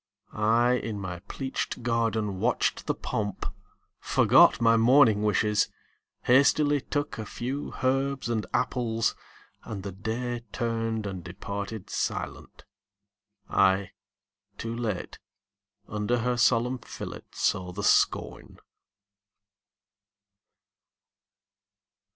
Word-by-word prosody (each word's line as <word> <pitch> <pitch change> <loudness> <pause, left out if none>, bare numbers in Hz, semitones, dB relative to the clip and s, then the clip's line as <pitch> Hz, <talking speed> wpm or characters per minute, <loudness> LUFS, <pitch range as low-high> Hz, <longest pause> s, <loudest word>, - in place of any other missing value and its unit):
I, 115 +3 +3
in 110 -4 -4
my 90 -3 -5
pleached 130 -2 -4
garden, 115 -4 0
watched - - 0
the - - +1
pomp, 105 -2 -3 0.5
Forgot - - +5
my 115 -1 +5
morning 115 -2 +5
wishes, 105 0 +2 0.5
hastily 145 +3 +4
Took 145 -3 -3
a 110 - -4
few 135 +5 -4
herbs 135 0 +1
and 110 -5 -1
apples, 120 -3 0 0.5
and 100 -4 -6
the 100 - -5
Day 115 +5 -3
Turned 115 -2 -2
and 95 -3 -5
departed 100 +3 -6
silent. - - -4 0.8
I, 95 0 +2 0.7
too 115 0 -4
late, 110 -6 -4 0.7
Under 105 +3 -1
her 125 +1 0
solemn 120 +1 +2
fillet 115 - -8
saw 90 -1 0
the 100 +3 -5
scorn. - - +1
115 Hz, 95 wpm, -27 LUFS, 105-125 Hz, 0.8 s, Forgot